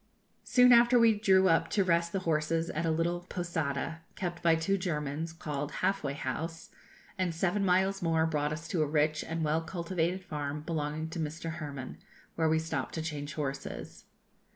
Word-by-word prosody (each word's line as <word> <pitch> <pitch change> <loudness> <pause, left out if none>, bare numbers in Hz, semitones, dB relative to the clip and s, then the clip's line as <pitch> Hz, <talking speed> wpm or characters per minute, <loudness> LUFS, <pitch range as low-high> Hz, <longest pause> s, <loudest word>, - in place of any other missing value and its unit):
Soon 250 -1 +6
after 240 +1 +6
we 230 -1 +6
drew 190 -3 +4
up 165 - +3
to 200 - +2
rest 170 -1 +2
the 195 - -1
horses 165 +1 0
at 165 +2 -1
a - - +2
little 165 +2 0
posada, 160 -2 -2
kept 175 -3 -4
by 165 -1 +4
two 165 +5 +1
Germans, 160 -4 -2
called 150 -3 -4
'Half 195 0 0
way 140 -1 -2
House,' 160 +5 -4 0.5
and 180 -3 0
seven 190 +4 +1
miles 190 +1 +2
more 165 -2 +2
brought 150 -2 0
us 165 +2 -5
to 170 - 0
a 155 - +2
rich 150 0 +1
and 165 0 -3
well 155 +2 +1
cultivated 175 +1 -2
farm 150 -3 -4
belonging 155 0 -3
to 165 - -5
Mr. 160 +1 -3
Hermann, 145 -5 -6 0.3
where 160 -1 +1
we 160 - +3
stopped 160 +1 -3
to 160 - -2
change 145 -3 -5
horses. 135 -2 -5
165 Hz, 180 wpm, -30 LUFS, 150-175 Hz, 0.5 s, Soon